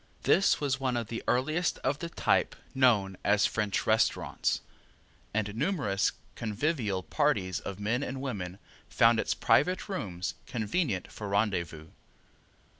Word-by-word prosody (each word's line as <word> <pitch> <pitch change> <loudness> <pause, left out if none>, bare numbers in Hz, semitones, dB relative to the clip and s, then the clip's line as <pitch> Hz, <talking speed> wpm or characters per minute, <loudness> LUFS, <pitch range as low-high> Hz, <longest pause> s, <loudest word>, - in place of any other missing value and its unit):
This 195 - +4
was 140 -2 0
one 130 -2 0
of 115 -2 -3
the 115 - -4
earliest 155 +8 +1
of 140 +2 0
the 170 - -4
type - - +1 0.2
known 105 -8 +3
as 105 0 +4
"French 105 -3 0
Restaurants," 110 +1 +1 0.7
and 105 -1 -1
numerous 135 - 0 0.2
convivial 110 - -1
parties 100 - 0
of 100 0 -7
men 110 +5 0
and 135 -1 -4
women 100 -9 -4 0.3
found - - +4
its - - 0
private 180 +6 +2
rooms 95 - -3
convenient 110 - -1
for 105 - -6
rendezvous. 85 -6 -1
110 Hz, 130 wpm, -30 LUFS, 100-140 Hz, 0.7 s, This